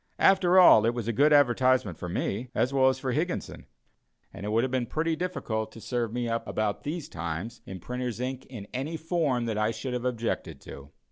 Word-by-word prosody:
After 185 -1 +4
all, 115 -12 +8
it 120 - 0
was 115 -3 -4
a 115 - 0
good 145 +7 +4
advertisement 130 - +3
for 90 - -6
me, 105 +7 -2
as 130 - +1
well 130 -1 +5
as 130 - -1
for 130 - -3
Higginson; 165 +7 -3 0.7
and 100 +1 -6
it - - -2
would 115 +2 +2
have 130 - -1
been 130 -2 -1
pretty 160 +1 -1
difficult 115 -12 -3
to - - -10
serve 120 -1 -2
me 120 0 -2
up 115 0 -2
about 105 -2 -1
these 155 +2 -4
times 85 +8 -5
in 95 -1 -7
printers' 125 +2 -4
ink 130 +1 -4
in 115 -6 -8
any 140 +6 -3
form 155 -7 0
that 110 -2 -2
I 105 0 +2
should 125 +2 -4
have 125 0 -3
objected 115 - -2
to. 70 +1 -11
125 Hz, 215 wpm, -27 LUFS, 110-140 Hz, 0.7 s, all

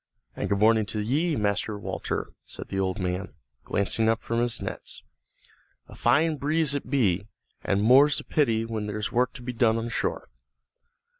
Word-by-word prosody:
"And - - -3
good 100 - +2
morning 110 0 +4
to 110 - -2
ye, 150 +10 0
Master 105 -1 -1
Walter," - - -4 0.2
said - - -8
the 95 - -2
old 95 +1 -1
man, 90 0 -3 0.3
glancing 110 +3 +1
up 115 0 0
from 115 0 -1
his 120 -1 0
nets. 95 - -6 0.8
"A - - -13
fine 160 0 +2
breeze 150 +1 +1
it 145 -3 -4
be, 105 -8 +1 0.4
an' 100 0 +1
more's 135 +6 +6
the - - -3
pity 115 -7 +1
when 110 -2 -4
there's 105 0 -3
work 125 0 +2
to 125 - -10
be 125 0 -4
done 115 -1 +3
on 115 +1 -3
shore." - - -2
115 Hz, 175 wpm, -26 LUFS, 105-130 Hz, 0.8 s, more's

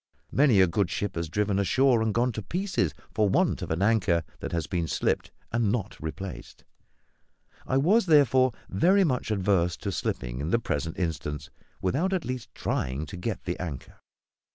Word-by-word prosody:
Many 130 -8 +5
a - - +7
good 95 +1 0
ship 100 +3 -2
has 85 -1 -3
driven 100 +3 0
ashore 125 +4 +3
and 110 -1 +1
gone 120 +4 +1
to 110 - -5
pieces 165 - -1 0.2
for 105 -2 +2
want - - +2
of - - -4
an 80 +4 0
anchor 100 -6 +2 0.2
that - - -5
has 85 -2 -1
been 85 -1 -2
slipped 65 - 0 0.2
and 115 -3 +1
not 105 -3 -2
replaced; 90 +4 -7 1.0
I 130 - +2
was, 190 +10 +3
therefore, 130 -4 +5 0.2
very 185 - +4
much 130 -10 0
averse 95 -5 +1
to - - -4
slipping - - -3
in 75 - -2
the 115 - +3
present 80 -8 -3
instance 75 -4 -3 0.3
without 160 - +1
at 185 -3 -1
least 125 -3 -4
trying 65 +5 -2
to 90 - -9
get 100 +6 -4
the 90 0 -3
anchor. 75 -8 -7
100 Hz, 175 wpm, -27 LUFS, 85-125 Hz, 1.0 s, a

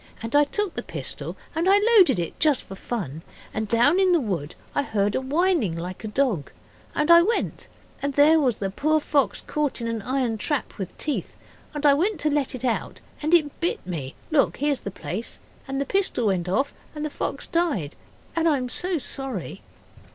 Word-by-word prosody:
And 230 +4 -3
I 295 0 +6
took 410 +5 -2
the - - -1
pistol. - - -6 0.2
And 335 +4 +1
I 395 - +7
loaded 410 - +5
it 170 -2 -4
just 300 -4 +3
for - - -10
fun. 190 - -4 0.3
And 220 0 -2
down 245 - +4
in 375 -2 +4
the 340 - +5
wood 180 - -3 0.2
I - - +2
heard 205 -6 0
a - - 0
whining 285 - +1
like 180 +4 -6
a - - -3
dog, 210 - 0 0.5
and 300 +3 +3
I 340 0 +10
went, 440 +7 -1 0.3
and 280 -1 -2
there 310 +3 +6
was 255 -6 +2
the 195 -1 -3
poor 310 +9 +2
fox 285 -2 +1
caught 300 -3 -2
in 235 - -4
an 230 -1 -2
iron 250 -1 -1
trap 285 -2 -2
with 190 - -5
teeth. 300 - -3 0.4
And 295 0 -2
I 285 - +8
went 360 +5 +1
to 305 - +1
let 285 -3 0
it 255 - -5
out 235 -3 -1 0.2
and 310 +1 -1
it 295 -4 +1
bit 345 - -1
me 155 -8 -5 0.2
look, 295 -3 +3
here's 285 -1 +1
the - - -5
place 200 +3 -6 0.3
and 270 0 -2
the 280 - 0
pistol 385 - 0
went 180 -4 +1
off 270 +9 +1 0.2
and 300 0 -3
the 305 - -3
fox - - -3
died, 305 - 0 0.4
and 335 0 +2
I 295 - +3
am 250 -1 -3
so 360 +6 0
sorry. 270 - -5
275 Hz, 205 wpm, -25 LUFS, 215-310 Hz, 0.5 s, I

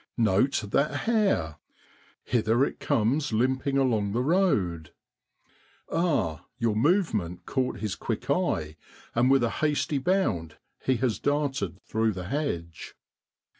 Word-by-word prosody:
Note 115 +4 +2
that 140 +2 +1
hare! 195 - +1 0.7
hither 120 +2 +2
it - - -6
comes 130 +6 +1
limping 130 +4 +1
along 110 -7 +1
the 120 +2 +1
road. 105 - +1 1.0
Ah! 140 - 0
your 115 -4 0
movement 110 - +1
caught 130 -5 -1
his 105 -3 -2
quick - - -4
eye, 80 -1 0 0.4
and 120 +2 +3
with 135 -2 +4
a 115 - +1
hasty 150 -1 +1
bound 130 - 0 0.3
he 130 - +2
has 120 -5 0
darted 135 - -1
through 110 0 0
the 90 -1 -6
hedge. 85 - -4
120 Hz, 125 wpm, -27 LUFS, 95-140 Hz, 1.0 s, with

